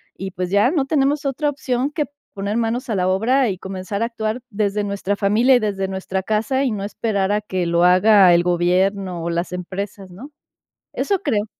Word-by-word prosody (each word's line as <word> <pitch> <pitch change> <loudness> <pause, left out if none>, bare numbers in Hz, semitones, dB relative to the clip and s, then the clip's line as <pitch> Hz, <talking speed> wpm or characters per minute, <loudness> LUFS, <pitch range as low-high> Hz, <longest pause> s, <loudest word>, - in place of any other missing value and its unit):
Y 195 - -5
pues 180 0 -4
ya, 205 +4 +4
no 290 -3 0
tenemos 285 +1 +1
otra 285 +2 0
opción 265 -2 -2
que 295 -1 -1 0.3
poner 200 +2 -3
manos 235 +3 -1
a - - 0
la 185 -1 +1
obra 230 +7 +2
y 190 - -3
comenzar 190 +3 -4
a - - +2
actuar 225 0 -3
desde 205 0 -1
nuestra 200 0 -2
familia, 220 +6 +3
y - - +4
desde 195 -3 -2
nuestra 190 0 -3
casa, 225 +7 0
y 260 - 0
no 200 -2 -4
esperar 200 -1 -1
a 210 +1 +1
que 185 -4 -3
lo 170 0 +2
haga 185 +1 +6
el 175 - +3
gobierno, 180 +1 0
o 170 - -2
las 170 +2 -2
empresas 190 +1 -6
¿no?, 250 +12 -11 0.6
eso 400 -2 0
creo. 220 - 0
205 Hz, 200 wpm, -20 LUFS, 190-245 Hz, 0.6 s, haga